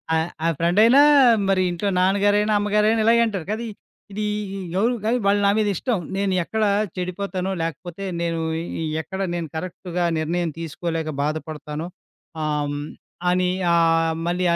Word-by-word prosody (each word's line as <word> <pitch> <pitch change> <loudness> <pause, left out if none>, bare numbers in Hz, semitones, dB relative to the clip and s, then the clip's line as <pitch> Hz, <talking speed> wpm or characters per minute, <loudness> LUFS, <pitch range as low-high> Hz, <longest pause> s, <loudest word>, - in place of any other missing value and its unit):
ఆహ్, 160 +1 0 0.2
ఆహ్, 165 - +2
ఫ్రెండైనా, 215 +11 +5 0.5
మరి 190 -1 +3
ఇంట్లో 175 +4 -2
నాన్నగారైన, 205 +3 +2
అమ్మగారైన 210 +2 +2
ఇలాగే 235 +1 +5
అంటారు 195 -7 -3
కదా! 220 +2 -2 0.5
ఇది 210 +2 -3 0.3
ఇ - - -4 0.2
ఎవరు 235 +4 +2
కానీ, 235 +3 +2
వాళ్ళు 200 +1 +3
నా - - +5
మీద 215 - +2
ఇష్టం. 230 +5 -1 0.2
నేను 195 -1 0
ఎక్కడ 220 +5 -2 0.3
చెడిపోతానో, 185 +1 -3
లేకపోతే 165 +3 -5 0.2
నేను 165 -1 -1 0.2
ఇ - - -5 0.2
ఇ - - -1 0.2
ఎక్కడ 190 +4 -7 0.2
నేను 170 -2 -3
కరెక్ట్‌గా 175 +1 -3
నిర్ణయం 170 +1 -1
తీసుకోలేక 165 0 -3
బాధపడతానో, 155 +1 -4 0.6
ఆహ్, 150 -1 0
హ్మ్. 145 +1 -4 0.4
అని 180 0 +2 0.2
ఆహ్, 165 -1 +3
మళ్ళీ 180 +1 0
180 Hz, 150 wpm, -22 LUFS, 165-205 Hz, 0.6 s, ఫ్రెండైనా